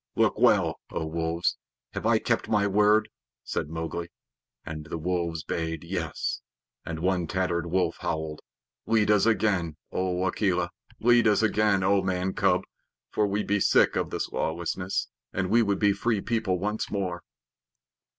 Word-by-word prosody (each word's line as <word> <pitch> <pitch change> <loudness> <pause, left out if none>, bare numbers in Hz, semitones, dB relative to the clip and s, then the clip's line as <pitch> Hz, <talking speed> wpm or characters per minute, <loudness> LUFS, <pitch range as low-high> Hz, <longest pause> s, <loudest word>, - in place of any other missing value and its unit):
"Look - - +2
well, - - +4
O 80 - -3
Wolves. 80 +1 -1 0.4
Have - - -2
I - - +5
kept - - -1
my 105 -2 +3
word?" 105 +2 +4 0.4
said 75 - -3
Mowgli. 80 +1 -4 0.6
And 75 -1 -6
the - - -4
wolves 85 -1 -2
bayed 80 0 -3
"Yes," 85 -2 -3 0.4
and 80 -1 -5
one 90 -1 +1
tattered 85 -1 -1
wolf 90 -1 0
howled: 80 -3 -3 0.5
"Lead 110 -2 +3
us 105 +1 +4
again, 95 -8 +1
O 90 0 -1
Akela. 90 -2 0 0.3
Lead 120 0 +5
us 105 +1 +3
again, 105 -3 +3
O 100 +1 +3
Man 95 0 -1
cub, - - +2 0.5
for 105 - +2
we 100 +1 -1
be 105 +1 +1
sick - - +4
of - - 0
this - - -2
lawlessness, 85 +3 -2 0.3
and 95 0 -1
we 120 +2 +5
would 100 -3 +1
be 105 -1 +4
the 100 - -3
Free 115 0 +1
People 110 -3 0
once 105 +4 -2
more." 90 -4 -2
95 Hz, 160 wpm, -27 LUFS, 85-105 Hz, 0.6 s, I